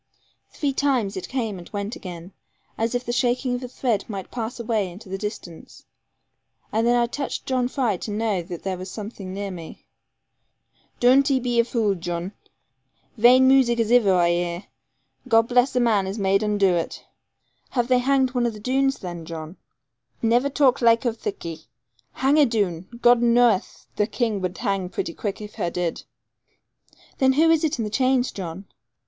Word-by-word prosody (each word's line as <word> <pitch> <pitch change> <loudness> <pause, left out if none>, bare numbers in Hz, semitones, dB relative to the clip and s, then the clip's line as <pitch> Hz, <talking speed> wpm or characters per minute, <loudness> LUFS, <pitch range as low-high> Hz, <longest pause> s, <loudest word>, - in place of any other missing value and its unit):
Three 285 -2 -2
times 260 -8 0
it 185 - -6
came 225 -7 -3
and 175 - -12
went 205 +2 -4
again, 175 0 -9 0.4
as 225 +1 -1
the 245 0 -2
shaking 250 +1 +1
of 245 - -3
a 250 - -5
thread 235 -4 -1
might 195 -3 -6
pass 235 0 -5
away 220 -4 -1
into 190 +3 -12
the 195 - -3
distance; 190 -5 -8 0.9
and 225 +2 +1
then 240 - +4
I 240 0 +3
touched 275 +4 -4
John 255 -2 0
Fry 245 -7 0
to 215 - -7
know 210 -3 -1
that 175 0 -8
there 190 -2 -3
was 185 +1 -7
something 205 -2 -7
near 200 +1 -4
me. 170 -3 -10 1.1
'Doon't 265 +3 +5
'e 270 -2 +3
be 240 -1 0
a - - +6
vule, 225 -4 0
Jan! 175 0 -4 0.8
Vaine 250 +3 +6
moozick 260 -3 +4
as 225 0 +1
iver 215 -6 +5
I 175 -1 +3
'eer. 175 +1 -2 0.6
God 225 -2 +5
bless 250 +1 +3
the 250 - 0
man 215 -5 +2
as 195 +3 -4
made 195 0 +2
un 210 -1 0
doo 195 -2 +4
it.' 170 -1 -3 0.6
'Have 245 -2 0
they 250 -1 +4
hanged 265 0 +2
one 245 -2 +1
of 230 - -3
the 210 - -10
Doones 270 +4 +1
then, 175 -3 -6
John?' 160 +1 -7
'Hush, 125 - -44
lad; 225 - +2
niver 245 +4 +3
talk 275 -3 +3
laike 230 0 +4
o' 235 - +1
thiccy. 165 -7 -6 0.5
Hang 275 +3 +2
a 290 - +6
Doone! 190 -6 -1 0.2
God 240 0 +6
knoweth, 235 -4 +2
the 210 - +2
King 225 -5 -1
would 185 -1 -3
hang 195 -5 -1
pretty 170 - -4
quick 205 +2 -4
if 210 0 -8
her 175 - +1
did.' 175 -1 -3 1.1
'Then 265 0 +4
who 320 +4 +4
is 325 -1 +3
it 310 -4 0
in 230 - -2
the 210 - -4
chains, 255 0 +2
John?' 185 0 -7
225 Hz, 190 wpm, -23 LUFS, 190-245 Hz, 1.1 s, a